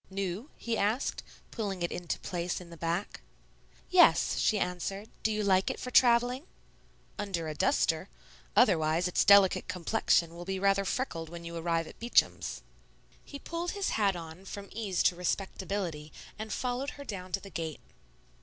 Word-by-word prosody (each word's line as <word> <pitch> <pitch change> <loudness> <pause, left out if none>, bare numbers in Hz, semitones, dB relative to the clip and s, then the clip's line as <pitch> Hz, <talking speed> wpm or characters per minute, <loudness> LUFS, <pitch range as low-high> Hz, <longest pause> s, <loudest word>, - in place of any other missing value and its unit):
"New?" 195 - -3
he 230 -1 -2
asked, 220 +7 0 0.3
pulling 195 -6 -3
it 170 - -1
into 175 -1 -3
place 175 0 -3
in 175 -2 -12
the - - -9
back. 170 +4 -3 0.7
"Yes," 365 -1 +5
she 215 - +3
answered; 195 +3 -3
"do 220 - +1
you 215 0 -1
like 190 -1 +3
it - - -4
for 250 - -5
travelling?" 245 +5 +4 0.7
"Under 185 -6 -2
a 155 - -3
duster. - - +1 0.5
Otherwise 160 +2 +4
its 180 - +2
delicate 200 -1 +6
complexion 170 -2 +1
will 170 +1 -8
be 190 +1 -3
rather 195 +1 +2
freckled 170 -9 -2
when 170 0 -9
you 170 0 -6
arrive 165 0 0
at - - -13
Beacham's." 235 +1 +1 0.6
He 285 - -8
pulled 335 +4 -4
his 400 -1 -1
hat 200 -3 +2
on 165 +1 -8
from 200 0 -8
ease 200 -6 -1
to 180 - +3
respectability 180 -3 -3 0.3
and 220 0 -5
followed 255 +4 -2
her 285 - -7
down 185 -7 -6
to 195 - +1
the 195 0 -12
gate. 160 -3 -4
195 Hz, 165 wpm, -30 LUFS, 170-220 Hz, 0.7 s, delicate